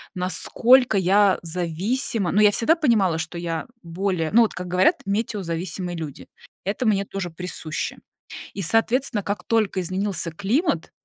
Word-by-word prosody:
насколько 220 +6 +3
я 195 +1 +4
зависима. 180 +5 -2
Ну, 210 - +3
я 210 -1 +6
всегда 235 +10 +3
понимала, 220 - +2
что 165 +1 -5
я 165 -2 -3 0.2
более 170 -1 -2
ну, 235 - +6
вот 220 - -1
как 180 0 -6
говорят, 180 +1 +3
метеозависимые 185 -4 -3
люди, 155 -4 -7 0.4
это 205 +6 -2
мне 200 -3 +2
тоже 195 -2 -5
присуще. 165 -2 -5 0.6
И, 200 - -5
соответственно, 225 - +1
как 205 +2 -3
только 215 -4 +1
изменился 185 -1 -2
климат, 210 - -1
190 Hz, 140 wpm, -23 LUFS, 175-215 Hz, 0.6 s, я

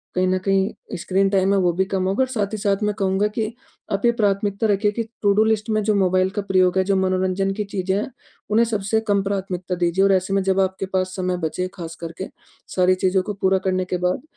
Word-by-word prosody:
कहीं 185 0 +2
न 185 0 +2
कहीं, 195 +1 +2 0.3
स्क्रीन 195 +2 +1
टाइम 195 0 +2
है, 195 - +3
वो 175 -2 +2
भी 190 +2 +1
कम 190 -1 -2
होगा 200 +7 +2
और - - -1
साथ 215 -5 -2
ही 215 - -1
साथ 200 0 0
मैं 210 0 +1
कहूँगा 195 0 +1
कि 220 +1 -3 0.4
आप 200 +4 0
ये 235 - +6
प्राथमिकता 205 -1 0
रखिए 205 +1 +2
कि 230 +2 -2 0.2
टू-डू 205 +1 +4
लिस्ट 220 0 0
में 215 0 +1
जो 210 0 +2
मोबाइल 185 -1 +2
का 205 0 -2
प्रयोग 185 -2 +2
है, 190 - +4
जो 195 0 +1
मनोरंजन 190 +1 +1
की 210 +1 -2
चीज़ें 190 -1 -2
हैं, 210 - -2 0.4
उन्हें 225 +3 +4
सबसे 220 -1 0
कम 200 -1 +2
प्राथमिकता 190 -2 -3
दीजिए 175 +2 +1
और 195 - +4
ऐसे 190 +1 0
में 195 - +2
जब 190 0 +1
आपके 190 0 0
पास 185 0 0
समय 185 -2 -1
बचे, 180 +2 -2
खास 165 -3 -7
करके, 170 +3 -6 0.5
सारी 185 0 +4
चीज़ों 185 0 +1
को 210 - -4
पूरा 190 -1 +2
करने 185 0 +1
के 180 - -2
बाद, 180 +6 -1
195 Hz, 240 wpm, -22 LUFS, 185-205 Hz, 0.5 s, ये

